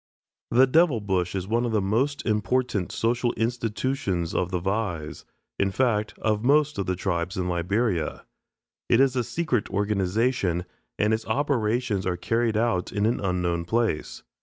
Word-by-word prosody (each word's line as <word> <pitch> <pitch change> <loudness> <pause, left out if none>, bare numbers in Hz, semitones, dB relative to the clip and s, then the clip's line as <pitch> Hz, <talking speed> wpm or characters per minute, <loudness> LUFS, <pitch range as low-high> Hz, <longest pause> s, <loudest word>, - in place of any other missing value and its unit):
ELLIS 120 - +2
The - - +8
"Devil 160 -6 +4
Bush" 95 -3 -1
is 95 -1 -3
one 115 +3 +1
of 120 - -1
the 110 - +3
most 120 +9 0
important 110 -1 0
social 120 +1 0
institutions 115 -5 -1
of 90 - 0
the 90 -1 -1
Vais, 90 -5 -3 0.4
in 100 - +2
fact, 110 -1 0
of 110 0 0
most 145 0 +3
of 100 - -2
the 95 - 0
tribes 90 0 -2
in 90 -1 -1
Liberia. 90 0 -1 0.6
It 115 - +5
is 135 -1 +4
a 125 - +1
secret 130 -4 -1
organization, 100 -1 0 0.3
and 105 +1 +2
its 110 0 -2
operations 115 -5 0
are 90 -1 -1
carried 115 +3 0
on 110 -6 +1
in 105 0 0
an 115 +2 +1
unknown 90 -3 -1
place. 110 -3 -1
105 Hz, 160 wpm, -25 LUFS, 95-120 Hz, 0.6 s, The